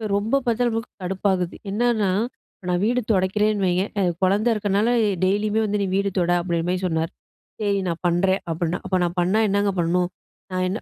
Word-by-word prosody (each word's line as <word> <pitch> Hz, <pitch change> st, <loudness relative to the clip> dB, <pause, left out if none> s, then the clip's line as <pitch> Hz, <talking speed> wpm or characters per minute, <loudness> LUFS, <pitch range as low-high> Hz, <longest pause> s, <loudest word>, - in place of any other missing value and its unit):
ரொம்ப 225 Hz, +7 st, +1 dB
பார்த்தா 240 Hz, +1 st, +1 dB
நமக்கு 225 Hz, +1 st, -4 dB
கடுப்பாகுது. 185 Hz, -1 st, -1 dB, 0.2 s
என்னன்னா 220 Hz, -2 st, +1 dB, 0.5 s
இப்ப 190 Hz, -, -17 dB
நான் 180 Hz, 0 st, +1 dB
வீடு 245 Hz, +2 st, +2 dB
துடைக்கிறேன்னு 205 Hz, +1 st, +1 dB
வைய்ங்க 180 Hz, +1 st, +2 dB, 0.2 s
அ 195 Hz, -, +2 dB, 0.2 s
குழந்தை 200 Hz, +5 st, +2 dB
இருக்கிறதுனால 205 Hz, +1 st, +1 dB, 0.3 s
டெய்லியுமே 205 Hz, +3 st, +1 dB
வந்து 210 Hz, 0 st, -1 dB
நீ 200 Hz, -, +1 dB
வீடு 200 Hz, 0 st, +1 dB
தொட 175 Hz, -1 st, +2 dB
அப்படின்ற 170 Hz, -1 st, -1 dB
மாரி 185 Hz, -, 0 dB
சொன்னார். 160 Hz, -1 st, -1 dB, 0.5 s
சரி 200 Hz, -1 st, +1 dB
நான் 170 Hz, -1 st, -3 dB
பண்றேன் 190 Hz, +3 st, +2 dB
அப்படின்னா 170 Hz, +2 st, -1 dB
அப்போ 185 Hz, 0 st, +1 dB
நான் 175 Hz, +1 st, -2 dB
பண்ணா 185 Hz, +5 st, +2 dB
என்னங்க 200 Hz, 0 st, +1 dB
பண்ணணும்? 175 Hz, +1 st, +1 dB, 0.4 s
நான் 185 Hz, 0 st, 0 dB
என்ன 195 Hz, +5 st, -2 dB
195 Hz, 180 wpm, -23 LUFS, 180-210 Hz, 0.5 s, வீடு